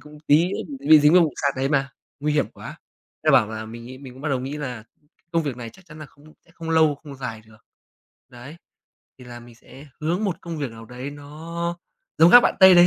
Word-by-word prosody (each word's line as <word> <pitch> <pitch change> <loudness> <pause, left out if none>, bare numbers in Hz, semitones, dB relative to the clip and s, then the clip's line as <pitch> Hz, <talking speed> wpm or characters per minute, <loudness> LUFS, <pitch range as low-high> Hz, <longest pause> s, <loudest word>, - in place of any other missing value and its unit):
cũng 150 +2 -14
tí 155 +4 +5
nữa - - -3 0.2
bị 140 - -7
bị 155 -1 +9
dính 150 +2 +5
vào 180 -1 +7
vụ 155 -4 0
sạt 140 -1 +1
đấy 135 +1 0
mà, 140 -1 0 0.3
nguy 150 0 0
hiểm 145 -2 +1
quá. - - -11 0.4
Thế - - +4
là - - +3
bảo 105 - +5
là 110 0 -6
mình 115 +2 -10
ấy, 130 - -10
mình 135 -2 -11
cũng 130 +2 -14
bắt 150 - -2
đầu 135 -2 0
nghĩ 135 +3 -5
là 125 -7 -6 0.5
công 165 -1 +2
việc 140 -5 -4
này 115 -2 -7
chắc 190 - -20
chắn 155 -1 -13
là 155 - -9
không 145 +2 -23 0.2
sẽ 170 - -25
không 165 0 -7
lâu, 160 -2 +4
không 145 0 -12
dài 125 -5 -6
được. 110 -1 -18 0.7
Đấy, 130 +6 -12 0.6
thì 125 - -13
là 120 -1 -10
mình 120 0 -15
sẽ 135 +4 -15
hướng 175 +7 -1
một 190 -4 -1
công 170 -2 -6
việc 140 -5 -3
nào 115 0 -11
đấy 125 +4 -7
nó 165 +4 -6 0.4
giống 165 +2 +7
các 245 - +11
bạn - - +1
Tây 190 -1 +9
đấy 175 0 +8
145 Hz, 260 wpm, -23 LUFS, 125-160 Hz, 0.7 s, các